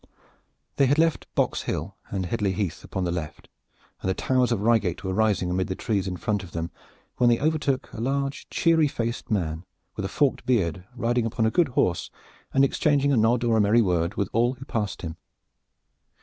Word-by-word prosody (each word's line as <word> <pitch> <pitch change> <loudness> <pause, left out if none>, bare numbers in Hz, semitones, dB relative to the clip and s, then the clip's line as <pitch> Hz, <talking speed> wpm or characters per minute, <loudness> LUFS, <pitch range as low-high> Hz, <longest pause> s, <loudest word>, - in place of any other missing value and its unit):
They 140 - +4
had 145 +3 +3
left 165 0 +2
Boxhill - - -1 0.2
and 95 -2 -2
Headley 100 0 0
Heath 95 -4 -3
upon 95 - -3
the 85 - 0
left, 85 -2 -6 0.5
and 95 - -2
the 95 - +1
towers 130 -2 +1
of 110 -4 0
Reigate 105 -6 +2
were 95 -1 -2
rising 105 -3 +1
amid 95 +1 0
the 95 - -3
trees 100 -3 -1
in 90 -1 -3
front 105 +2 -1
of 90 -4 -11
them, 85 +1 -3 0.5
when 120 - +4
they 120 - +3
overtook 150 -3 0
a 110 - -5
large, 140 +2 -2
cheery, 165 -2 +3
red 145 - -1
faced 115 -2 -3
man, 85 -6 -1 0.3
with 105 - -4
a - - -1
forked 140 +5 +1
beard, 90 -8 0
riding 120 -1 +1
upon 110 0 0
a 110 - +2
good 175 +3 +3
horse 90 -1 +1 0.4
and 135 0 +4
exchanging 140 0 +2
a - - +4
nod 115 +2 +3
or 115 -2 +3
a - - +4
merry 110 +3 +4
word 90 0 0
with 100 -3 0
all 120 +3 +3
who 130 +1 -10
passed 105 -8 -3
him. 80 0 -5
110 Hz, 205 wpm, -25 LUFS, 95-130 Hz, 0.5 s, They